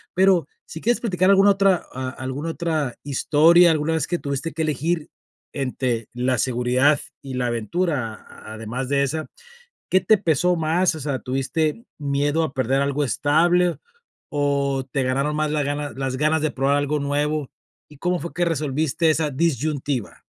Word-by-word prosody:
Pero 185 -5 +4 0.2
si 160 - -9
quieres 240 +2 +1
platicar 185 -5 +1
alguna 200 +1 +6
otra 195 -2 +2
a 130 0 -4
alguna 130 +5 -5
otra 160 -7 -2
historia, 160 +5 +5
alguna 155 +1 0
vez 160 -3 -1
que 175 - -1
tuviste 140 +3 -3
que 160 0 -2
elegir 155 +2 -1 0.4
entre 125 -4 -2
la 125 +1 0
seguridad 130 +3 +2 0.2
y 135 -2 -7
la 125 -1 0
aventura, 120 - -2 0.3
además 115 +4 -5
de 140 -1 +2
esa, 155 +3 -2 0.6
¿qué 185 - +4
te 215 - +4
pesó 180 -1 +2
más? 165 +3 +2
O - - -6
sea, 140 -2 -2
¿tuviste 150 - -2
miedo 145 +2 0
a 155 - -3
perder 135 +1 +1
algo 140 +1 0
estable 170 +6 +2 0.5
o 140 -2 0
te 135 - 0
ganaron 135 +4 0
más 155 0 0
la 150 -1 0
ganas 145 +1 -3
las 135 -1 -2
ganas 155 +2 +2
de 155 -1 0
probar 135 +2 +1
algo 145 +1 0
nuevo? 145 0 -1 0.4
¿Y 150 - -15
cómo 180 +4 -1
fue 170 - -7
que 175 0 0
resolviste 155 0 0
esa 155 -1 0
disyuntiva? 145 -4 -2
145 Hz, 165 wpm, -22 LUFS, 135-165 Hz, 0.6 s, alguna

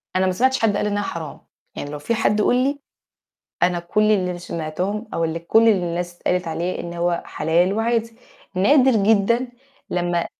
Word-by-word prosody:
أنا 185 0 +3
ما 185 - +2
سمعتش 260 +7 +1
حد 210 -3 +2
قال 210 - 0
إنّها 205 0 -1
حرام، 165 -6 -6 0.4
يعني 145 - -5
لو 150 - -6
في 230 +11 -1
حد 210 -1 +1
قُل 245 - +3
لي، 280 +1 -1 0.8
أنا 175 0 +3
كل 210 +5 +1
اللي 180 -3 0
سمعتهم 180 +6 -4
أو 165 - 0
اللي 165 0 -2
كل 225 +7 +4
اللي 200 -5 +3
الناس 175 0 -4
قالت 180 -1 +1
عليه 175 +3 -3
إن 170 0 -6
هو 175 0 -1
حلال 175 +4 +1
وعادي، 230 +1 -1 0.4
نادر 250 +3 +4
جدًا 235 +4 +2 0.4
لمّا 175 -1 0
185 Hz, 180 wpm, -21 LUFS, 175-225 Hz, 0.8 s, كل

